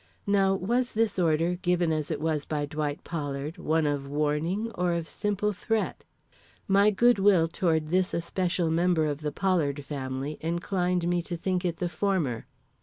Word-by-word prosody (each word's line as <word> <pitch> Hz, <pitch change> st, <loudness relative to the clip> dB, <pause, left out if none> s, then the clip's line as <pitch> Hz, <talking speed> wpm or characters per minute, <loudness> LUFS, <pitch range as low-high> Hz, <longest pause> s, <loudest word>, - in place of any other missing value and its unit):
Now 195 Hz, -1 st, +3 dB
was 240 Hz, +7 st, 0 dB
this 220 Hz, -3 st, +1 dB
order, 165 Hz, +1 st, +2 dB
given 175 Hz, -2 st, +1 dB
as 155 Hz, -1 st, -2 dB
it 155 Hz, -3 st, -2 dB
was 155 Hz, -1 st, -1 dB
by 150 Hz, -1 st, -2 dB
Dwight 145 Hz, 0 st, -3 dB
Pollard, 145 Hz, -1 st, -4 dB
one 160 Hz, 0 st, +1 dB
of 145 Hz, -1 st, -1 dB
warning 155 Hz, +9 st, -1 dB
or 180 Hz, -1 st, 0 dB
of 170 Hz, -1 st, -2 dB
simple 210 Hz, +2 st, -1 dB
threat? 220 Hz, +3 st, -2 dB, 0.6 s
My 200 Hz, +2 st, +5 dB
good 240 Hz, +2 st, +4 dB
will 190 Hz, -4 st, +5 dB
toward 160 Hz, -2 st, 0 dB
this 185 Hz, +2 st, +2 dB
especial 170 Hz, 0 st, -1 dB
member 170 Hz, -1 st, +2 dB
of 150 Hz, 0 st, -2 dB
the 150 Hz, -1 st, -2 dB
Pollard 150 Hz, -7 st, 0 dB
family 135 Hz, +1 st, -4 dB
inclined 175 Hz, +1 st, 0 dB
me 175 Hz, 0 st, +1 dB
to 175 Hz, 0 st, -5 dB
think 185 Hz, +1 st, -1 dB
it 170 Hz, -2 st, -1 dB
the 180 Hz, -, -1 dB
former. 170 Hz, -, -1 dB
170 Hz, 170 wpm, -27 LUFS, 150-190 Hz, 0.6 s, My